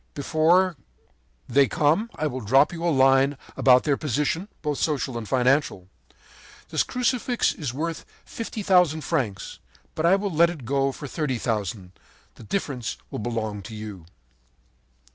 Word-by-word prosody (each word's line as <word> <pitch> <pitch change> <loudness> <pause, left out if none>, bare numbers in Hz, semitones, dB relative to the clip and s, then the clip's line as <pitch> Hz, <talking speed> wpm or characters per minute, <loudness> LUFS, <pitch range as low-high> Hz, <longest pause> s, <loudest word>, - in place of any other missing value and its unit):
Before 165 +4 +2 0.7
they 140 -1 +4
come 160 +10 +1
I 155 - -2
will 130 -3 -3
drop 135 +9 +4
you 165 -1 -6
a 175 - +2
line 135 -1 +4 0.2
about 125 -1 +5
their 145 -3 +1
position, 150 - -1 0.2
both 150 -2 -2
social 140 -5 -1
and 115 -3 -5
financial. 130 -7 +1 0.8
This - - +1
Crucifix 250 -1 0
is 145 -7 -4
worth 160 +5 -4 0.2
fifty 225 -2 -6
thousand 180 -5 +3
francs; 125 - -3 0.3
but 160 +1 0
I 185 - +6
will 200 0 -2
let 170 +2 +5
it 155 -8 -8
go 135 +2 +1
for 145 - -9
thirty 145 -2 -2
thousand. 105 -5 -3 0.4
The - - -16
difference 125 - -3
will - - -4
belong 110 -2 -3
to 110 +3 -9
you.' 105 -6 -8
140 Hz, 150 wpm, -24 LUFS, 120-165 Hz, 0.8 s, I